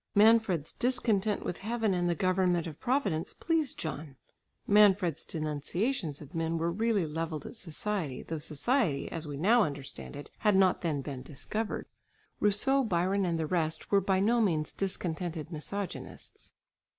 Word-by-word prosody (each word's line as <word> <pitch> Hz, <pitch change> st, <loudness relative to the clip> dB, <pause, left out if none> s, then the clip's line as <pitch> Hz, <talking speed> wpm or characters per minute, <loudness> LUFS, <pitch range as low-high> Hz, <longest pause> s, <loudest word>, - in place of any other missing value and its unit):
Manfred's 210 Hz, -7 st, +4 dB
discontent 220 Hz, -5 st, +1 dB
with 175 Hz, -, -3 dB
heaven 220 Hz, -1 st, 0 dB
and 175 Hz, -1 st, +1 dB
the 170 Hz, -, +1 dB
government 180 Hz, -1 st, +2 dB
of 160 Hz, -2 st, -7 dB
Providence 200 Hz, -, 0 dB
pleased 320 Hz, -5 st, 0 dB
John. 155 Hz, -3 st, -5 dB, 0.5 s
Manfred's 200 Hz, -6 st, +4 dB
denunciations 155 Hz, -, -2 dB
of 150 Hz, +3 st, -12 dB
men 165 Hz, 0 st, -1 dB
were 165 Hz, +1 st, 0 dB
really 215 Hz, -1 st, +1 dB
levelled 160 Hz, -1 st, -4 dB
at -, -, -8 dB
society, 180 Hz, -, -3 dB
though 160 Hz, -1 st, -4 dB
society 155 Hz, -, 0 dB
as 165 Hz, -2 st, -4 dB
we 145 Hz, -1 st, -5 dB
now 220 Hz, +10 st, +5 dB
understand 140 Hz, -5 st, -4 dB
it, 145 Hz, -, -9 dB
had 210 Hz, -2 st, +3 dB
not 190 Hz, -1 st, +4 dB
then 150 Hz, -5 st, -1 dB
been 135 Hz, -3 st, -5 dB
discovered. 210 Hz, -, -4 dB, 0.5 s
Rousseau, 255 Hz, +7 st, +3 dB
Byron 190 Hz, -1 st, +1 dB
and 170 Hz, -1 st, 0 dB
the 160 Hz, -, -1 dB
rest 160 Hz, -1 st, -1 dB
were 200 Hz, -1 st, +5 dB
by 190 Hz, 0 st, +2 dB
no 230 Hz, +4 st, +3 dB
means 160 Hz, -8 st, +1 dB
discontented 175 Hz, -4 st, -3 dB
misogynists. 190 Hz, +5 st, -6 dB
180 Hz, 150 wpm, -30 LUFS, 155-210 Hz, 0.5 s, now